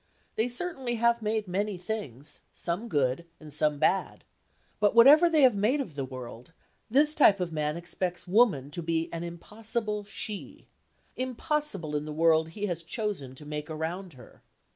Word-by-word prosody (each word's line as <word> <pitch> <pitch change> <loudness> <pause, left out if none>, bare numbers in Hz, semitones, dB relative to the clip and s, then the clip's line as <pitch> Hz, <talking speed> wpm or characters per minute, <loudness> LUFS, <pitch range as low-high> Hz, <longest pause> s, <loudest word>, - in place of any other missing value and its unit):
They 220 - +1
certainly 260 -2 -2
have 235 0 +2
made 215 -1 -1
many 200 +2 -1
things, 150 - -6
some 180 +7 -4
good 140 - 0
and 150 -2 -9
some 150 0 +1
bad. 170 +6 0 0.6
But 205 +1 +3
whatever 290 +8 +8
they 310 -3 +4
have 250 -5 +6
made 220 +9 +2
of 225 - -4
the 140 -1 -3
world, 130 +1 -9 0.4
this 295 +6 +4
type 210 -10 +5
of 175 -2 -3
man 150 0 -1
expects 175 +1 -4
woman 180 - +3
to 170 - -4
be 165 0 -1
an 165 0 -4
impossible 210 +4 -4
She,—impossible 245 - -5
in 150 0 -1
the 155 - -5
world 160 0 +3
he 205 +5 -4
has 175 -4 -3
chosen 170 - -4
to 150 - -13
make 150 +1 -5
around 165 +3 -4
her. 130 - -16
180 Hz, 165 wpm, -28 LUFS, 155-225 Hz, 0.6 s, whatever